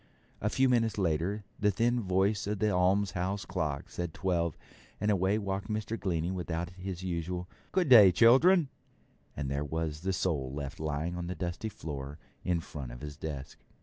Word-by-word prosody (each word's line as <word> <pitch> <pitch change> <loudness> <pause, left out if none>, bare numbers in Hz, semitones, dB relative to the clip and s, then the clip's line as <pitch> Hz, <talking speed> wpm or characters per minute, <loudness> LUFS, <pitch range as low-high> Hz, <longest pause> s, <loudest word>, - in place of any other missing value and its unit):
A 105 - +1
few 130 +4 +3
minutes 115 -4 +2
later 95 +3 0 0.2
the 105 - +3
thin 120 +5 +1
voice 100 +2 +1
of 105 0 -1
the 105 +1 +1
almshouse 95 +1 +1
clock 80 -7 -2
said 85 -2 -4
twelve, 85 -3 0 0.4
and 105 +1 +2
away 95 +1 +2
walked 100 -2 -3
Mr. 110 +1 -2
Glennie 85 -5 -1
without 85 -2 -3
his 90 0 -6
usual 90 0 -3 0.2
'Good 185 -3 +2
day, 105 -7 +10
children', 135 - +6 0.7
and 70 -1 -2
there 70 +2 -1
was 80 0 -3
the 95 +2 0
sole 75 -8 -1
left 70 +2 -5
lying 80 +3 -2
on 85 -1 -4
the 90 - -3
dusty 85 +6 -3
floor 70 -6 -6 0.3
in 85 -2 0
front 70 -6 -7
of - - -10
his 75 -1 -6
desk. 70 -2 -6
90 Hz, 175 wpm, -31 LUFS, 80-105 Hz, 0.7 s, day